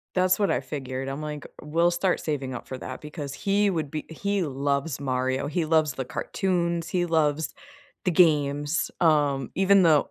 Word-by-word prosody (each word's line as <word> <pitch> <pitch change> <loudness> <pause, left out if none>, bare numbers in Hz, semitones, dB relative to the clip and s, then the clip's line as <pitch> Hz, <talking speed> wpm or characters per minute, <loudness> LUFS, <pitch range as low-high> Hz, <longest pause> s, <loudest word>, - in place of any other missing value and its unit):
That's 185 +1 +3
what 200 - +2
I - - +1
figured. 130 -1 -5
I'm 135 +3 -4
like, 150 -1 -5 0.2
we'll 170 +3 +2
start 180 +1 0
saving 135 -4 -3
up - - -7
for 130 - -5
that, 130 0 -7
because 150 -2 -6
he 200 0 +2
would 155 -5 -2
be 155 - -4
he 200 +4 -1
loves 140 0 -1
Mario, 130 0 -1
he 160 +2 -1
loves 155 -3 +2
the 130 - -3
cartoons, 170 +1 -1
he 175 -1 0
loves 160 - +1 0.5
the 185 - +2
games, 145 -2 +2
um, 145 -5 +2
even 195 0 +5
though 155 -4 +4
155 Hz, 180 wpm, -26 LUFS, 140-175 Hz, 0.5 s, even